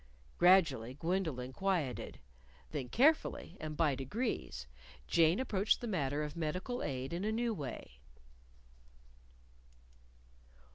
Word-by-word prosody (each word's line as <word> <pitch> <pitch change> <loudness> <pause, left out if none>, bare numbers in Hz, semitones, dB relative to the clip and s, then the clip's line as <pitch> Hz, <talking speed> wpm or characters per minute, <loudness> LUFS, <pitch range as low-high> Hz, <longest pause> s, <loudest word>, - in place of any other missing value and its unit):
Gradually 155 -10 +5
Gwendolyn 155 -6 -2
quieted. 170 - -1 0.5
Then 125 - -4
carefully, 305 +6 +2
and 155 -1 -5
by 155 -4 +3
degrees, 135 - -3 0.4
Jane 165 +2 +4
approached 215 -5 +2
the - - -5
matter 150 - -1
of 150 0 -5
medical 180 +10 -2
aid 130 +1 -3
in 175 +3 -2
a 215 - 0
new 230 +1 0
way. 130 - -7
165 Hz, 105 wpm, -34 LUFS, 135-195 Hz, 0.5 s, Gradually